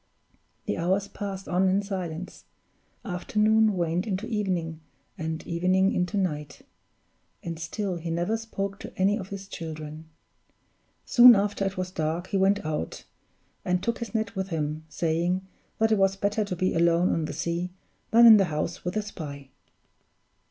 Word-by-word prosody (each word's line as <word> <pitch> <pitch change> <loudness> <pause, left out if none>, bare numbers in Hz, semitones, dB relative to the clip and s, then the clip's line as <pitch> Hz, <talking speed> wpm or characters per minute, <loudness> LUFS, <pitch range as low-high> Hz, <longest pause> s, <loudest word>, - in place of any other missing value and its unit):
The - - -2
hours 190 +4 +1
passed 195 -1 -6
on 185 +2 +2
in 195 +2 +2
silence; 185 -3 -5 0.6
afternoon 215 +3 +2
waned 175 +3 0
into 200 +1 -2
evening, 185 -8 -2 0.4
and 160 0 -4
evening 185 +3 +2
into 180 +3 -1
night; 150 -7 -3 0.8
and 165 -1 -5
still 185 +2 -3
he 165 0 -5
never 175 +6 0
spoke 200 -3 -4
to - - -8
any 195 +2 +3
of 190 -1 -7
his 195 -1 -7
children. 155 -2 -7 1.0
Soon 240 -1 +9
after 200 0 0
it 195 0 -3
was 185 0 -3
dark, 160 +1 -2
he 200 - 0
went 195 -1 +2
out, 150 - -3 0.6
and 180 0 0
took 235 0 -1
his 235 -1 -6
net 220 -2 -1
with 190 0 -2
him, 155 -2 -3
saying 175 +4 0 0.3
that 220 0 +2
it 215 - +3
was 195 0 +3
better 200 +2 0
to 185 - -3
be 185 +1 0
alone 170 +1 +3
on 160 - 0
the - - -4
sea 170 +3 -2 0.4
than 235 +1 +7
in 225 -2 +10
the 195 - +4
house 155 +2 -3
with 180 +4 -2
a 215 - 0
spy. 140 -9 -8
185 Hz, 165 wpm, -27 LUFS, 165-200 Hz, 1.0 s, in